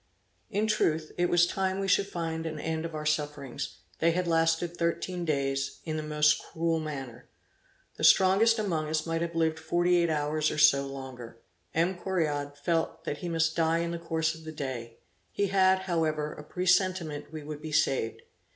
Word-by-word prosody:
In 210 +1 0
truth, 160 -7 +1
it 175 0 +1
was 175 0 +5
time 190 +1 -1
we 195 - -1
should 195 +1 +3
find 165 -3 -3
an 155 -1 -5
end 160 +1 -2
of 165 -1 -5
our 150 0 -4
sufferings; 150 - -3 0.2
they 165 - +4
had 180 +1 0
lasted 165 +1 +1
thirteen 175 +1 -2
days, 140 -2 -1
in 155 -2 -3
the 155 - -2
most 150 0 +2
cruel 165 0 -1
manner. 135 -6 -6 0.7
The - - -6
strongest 200 +5 +6
among 165 -8 -1
us 155 0 0
might 165 0 -1
have 170 0 -3
lived 160 -1 +1
forty 175 +2 +2
eight 170 -1 +2
hours 150 0 0
or - - -4
so, 140 -2 +5
longer. 130 -4 -8 0.4
M. 170 +4 +2
Correard 150 -6 -2
felt 165 +1 -1
that 145 - -3
he 175 - -4
must 160 -1 +1
die 165 0 +2
in 170 0 -1
the 170 - -4
course 160 -1 0
of 160 0 -12
the 160 - -7
day; 125 -6 -5 0.3
he 200 -1 0
had, 190 -1 +4
however 155 -4 -1
a 150 - -10
presentiment 180 -3 0
we 155 -1 -7
would 150 0 -7
be 155 - -6
saved. 130 -6 +1
160 Hz, 190 wpm, -29 LUFS, 150-175 Hz, 0.7 s, strongest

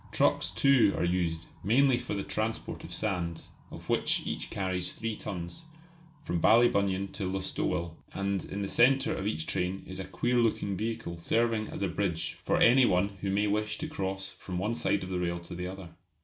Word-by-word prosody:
Trucks - - +2
too 135 -7 +4
are - - 0
used, 85 -2 0 0.2
mainly 125 +5 +4
for - - -4
the 100 - -2
transport 110 +1 -3
of - - -9
sand 90 -6 -2 0.3
of - - -10
which - - +2
each - - -4
carries 95 -2 -2
three 115 -1 -4
tons 90 - -5 0.6
from 85 - -1
Ballybunion 100 -4 +4
to 95 -3 -3
Listowel: 85 -3 -2 0.2
and 100 -1 -1
in 100 +1 -4
the - - -2
centre 135 +8 +4
of 100 - -3
each 80 -7 -2
train 90 +3 -1
is 95 0 -6
a 95 - -4
queer 120 +6 0
looking 110 -4 +1
vehicle 110 -4 -3
serving 115 +4 +1
as - - -5
a - - +2
bridge 90 -2 -2
for - - +2
any 130 +3 +6
one 90 +3 +2
who 100 - -1
may 100 +2 +2
wish 105 +1 0
to - - -4
cross 95 0 -3
from 90 -2 -7
one 105 +5 0
side 100 -4 0
of 95 - -6
the 90 - -1
rail 85 -1 -1
to 85 - -9
the 90 +1 -4
other. 95 -1 -8
100 Hz, 195 wpm, -30 LUFS, 90-110 Hz, 0.6 s, any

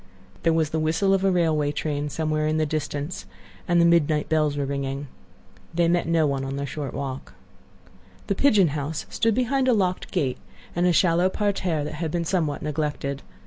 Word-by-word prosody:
There 165 - +3
was 160 -2 +1
the 160 - 0
whistle 165 +5 +2
of 195 0 +1
a 195 - +4
railway 160 -5 +2
train 145 0 -2
somewhere 155 0 -1
in 155 0 +1
the 155 - +2
distance, 150 +1 -4 0.4
and 175 -1 +3
the 170 - +5
midnight 160 -3 +3
bells 155 -2 +1
were 140 - 0
ringing. 140 0 -3 0.7
They 170 0 +3
met 170 0 +1
no 165 -1 +3
one 140 -2 -1
in 135 0 -4
their 140 0 -3
short 140 -1 -5
walk. 135 -1 -5 0.9
The - - 0
"pigeon 200 - +4
house" 150 +2 -3
stood 225 -2 +1
behind 255 +2 +1
a 255 - +5
locked 185 -4 0
gate, 140 -8 -1 0.4
and 175 +1 +2
a - - +4
shallow 175 +1 +3
parterre 190 -6 -1
that 145 - -5
had 165 - -1
been 170 +1 -2
somewhat 160 -5 -1
neglected. 150 -2 -2
155 Hz, 190 wpm, -24 LUFS, 145-175 Hz, 0.9 s, the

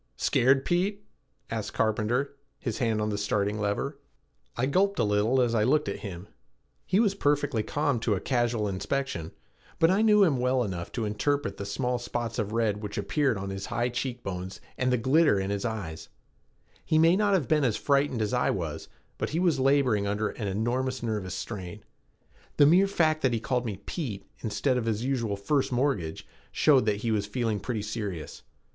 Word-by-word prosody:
"Scared, 135 +2 +3
Pete?" 200 +4 0 0.5
asked 110 -2 -3
Carpenter, 115 +6 0 0.2
his 115 -4 -4
hand 115 -3 +1
on 105 - -1
the 105 -1 -2
starting 105 +1 0
lever. 105 +8 -2 0.6
I 120 - +1
gulped 195 +8 +2
a - - +2
little 105 +5 +2
as 120 -2 +2
I 110 -2 +3
looked 150 +6 +2
at - - -3
him. 95 -2 -7 0.6
He 190 - +3
was 210 -4 +3
perfectly 145 - +1
calm 145 +1 0
to 110 -2 +1
a - - -2
casual 120 -3 0
inspection, 100 - -3 0.5
but 165 +2 +4
I 195 +3 +3
knew 210 -2 +6
him 150 -9 +2
well 125 0 +2
enough 90 -5 -5
to 115 - -2
interpret 105 +1 -1
the 100 - -5
small 125 +4 -1
spots 120 -1 -3
of 105 -1 -2
red 110 -2 0
which 105 -1 -6
appeared 110 +5 +1
on 95 0 -4
his 95 0 -5
high 120 0 0
cheekbones 115 -7 -4 0.2
and 130 0 0
the 125 - +3
glitter 130 -1 +3
in 95 +1 -2
his 100 +1 -2
eye. 105 -9 -3 0.9
He 155 - +1
may 165 +2 +5
not 205 0 +3
have 165 -9 0
been 150 -2 +2
as 120 -5 +1
frightened 140 -5 +1
as 105 - -2
I - - +2
was - - -3 0.3
but - - -1
he 160 - -1
was 170 -6 +2
laboring 130 -7 +3
under 105 +1 0
an 105 - -5
enormous 120 +6 -1
nervous 105 -6 -2
strain. 105 -1 -6 0.7
The 145 - +7
mere 180 +6 +5
fact 155 -5 +1
that 130 -2 +2
he 115 - 0
called 125 +1 -1
me 100 -4 -4
"Pete" 120 - -4
instead 125 +4 0
of 115 - -4
his 110 +1 -1
usual 120 -6 -1
"First 135 +8 0
Mortgage" 120 - -1 0.2
showed 135 -7 +4
that 105 -1 +1
he 115 - 0
was 105 -2 0
feeling 110 -2 -1
pretty 110 -3 -3
serious. 105 -7 -5
120 Hz, 190 wpm, -28 LUFS, 105-140 Hz, 0.9 s, The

